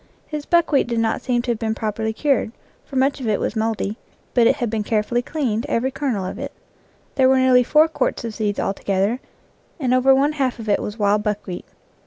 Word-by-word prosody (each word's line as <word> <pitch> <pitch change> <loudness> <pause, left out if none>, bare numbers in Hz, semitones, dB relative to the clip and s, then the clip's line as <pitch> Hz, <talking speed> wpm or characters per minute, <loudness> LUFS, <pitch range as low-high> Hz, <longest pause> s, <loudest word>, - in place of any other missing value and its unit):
His 300 -1 -6
buckwheat 325 -6 +3
did 235 -1 -1
not 225 -1 0
seem 245 -2 0
to 245 - 0
have 230 - -2
been 220 -1 -1
properly 220 0 -2
cured, 265 -1 0 0.3
for 275 - -11
much 270 +2 +2
of 240 - -3
it 210 -2 +1
was - - -2
mouldy, 220 -1 -1 0.3
but 235 -2 +5
it - - +4
had 240 - -2
been 220 0 -1
carefully 220 +2 0
cleaned, 245 -5 -2
every 255 +3 0
kernel 260 -8 -2
of 185 - -5
it. - - -5 0.6
There 260 -1 +4
were 265 - +4
nearly 260 -1 +5
four 305 +5 +4
quarts 320 - -2
of 230 - -4
seeds 210 -2 -2
altogether, 195 +4 0 0.6
and 255 -4 +1
over 260 +1 +5
one 280 +3 +3
half 270 -5 -1
of 225 -2 -8
it 205 - +2
was 210 - -5
wild 205 -1 +2
buckwheat. 210 -4 -4
235 Hz, 215 wpm, -21 LUFS, 215-265 Hz, 0.6 s, but